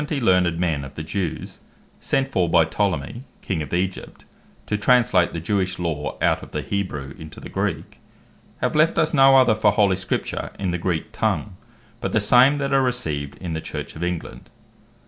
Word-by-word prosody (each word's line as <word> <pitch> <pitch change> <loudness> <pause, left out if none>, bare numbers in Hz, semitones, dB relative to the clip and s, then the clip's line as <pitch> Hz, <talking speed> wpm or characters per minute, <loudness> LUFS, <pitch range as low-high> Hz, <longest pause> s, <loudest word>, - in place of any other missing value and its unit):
learned 90 - +2
men 80 -5 0
of 70 - -10
the 80 - -5
Jews, 90 +1 -4 0.4
sent 135 0 0
for 90 -10 +1
by 80 -1 +5
Ptolemy 95 - -2 0.2
King 90 -5 -2
of 75 - -6
Egypt, 90 +2 -3 0.4
to 105 - -1
translate 105 -5 +3
the 85 - -4
Jewish 95 +1 -1
Law, 80 -4 -3
out - - +2
of - - -12
the - - -2
Hebrew 75 -9 -3
into 80 -1 -10
the - - -9
Greek, - - -3 0.6
have - - 0
left 155 +2 +3
us 155 0 +2
no 135 -2 +7
other 125 -4 +5
for 110 - +3
holy 100 -4 +3
Scripture 95 0 -3
in 95 -2 -2
the 90 - -2
Greek 85 -2 -2
tongue, 105 -4 -1 0.4
but - - -3
the 110 - +4
same 125 +7 +5
that 140 -1 -1
are 135 - +4
received 80 - -2
in 90 -3 -5
the 80 - -3
Church - - -6
of 80 - -5
England. 90 -1 -5
95 Hz, 185 wpm, -22 LUFS, 80-120 Hz, 0.6 s, no